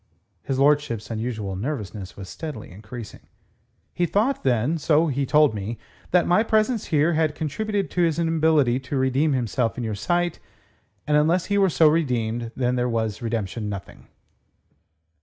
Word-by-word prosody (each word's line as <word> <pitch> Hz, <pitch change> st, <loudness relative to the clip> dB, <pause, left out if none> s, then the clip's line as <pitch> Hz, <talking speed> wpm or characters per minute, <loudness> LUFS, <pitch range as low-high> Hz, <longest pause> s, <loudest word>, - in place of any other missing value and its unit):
His 135 Hz, -1 st, -3 dB
lordship's 140 Hz, -6 st, +1 dB
unusual 110 Hz, -4 st, -3 dB
nervousness 105 Hz, -4 st, -5 dB
was 95 Hz, -1 st, -8 dB
steadily 145 Hz, -, -7 dB
increasing. 105 Hz, +3 st, -10 dB, 0.7 s
"He 175 Hz, -, 0 dB
thought, 230 Hz, +9 st, +1 dB
then 130 Hz, +5 st, +1 dB
so 155 Hz, +1 st, +3 dB
he 140 Hz, 0 st, -1 dB
told 150 Hz, -3 st, +4 dB
me 105 Hz, +3 st, -4 dB, 0.3 s
that 180 Hz, -1 st, +3 dB
my 180 Hz, +4 st, +4 dB
presence 220 Hz, +1 st, +1 dB
here 155 Hz, +2 st, +2 dB
had 155 Hz, -1 st, +1 dB
contributed 200 Hz, +7 st, -2 dB
to 180 Hz, -, 0 dB
his 165 Hz, -3 st, +2 dB
inability 160 Hz, -6 st, +2 dB
to 135 Hz, +1 st, -4 dB
redeem 135 Hz, +3 st, +2 dB
himself 120 Hz, -1 st, -1 dB
in 125 Hz, -, -3 dB
your 110 Hz, -2 st, -2 dB
sight; 175 Hz, -, -1 dB, 0.7 s
and 150 Hz, -1 st, +3 dB
unless 165 Hz, +4 st, +2 dB
he -, -, +3 dB
were 195 Hz, -1 st, +4 dB
so 160 Hz, -1 st, +4 dB
redeemed, 120 Hz, -7 st, 0 dB
then 125 Hz, -1 st, 0 dB
was 110 Hz, -2 st, -2 dB
redemption 110 Hz, -2 st, -3 dB
nothing." 100 Hz, -3 st, -8 dB
135 Hz, 155 wpm, -24 LUFS, 115-160 Hz, 0.7 s, told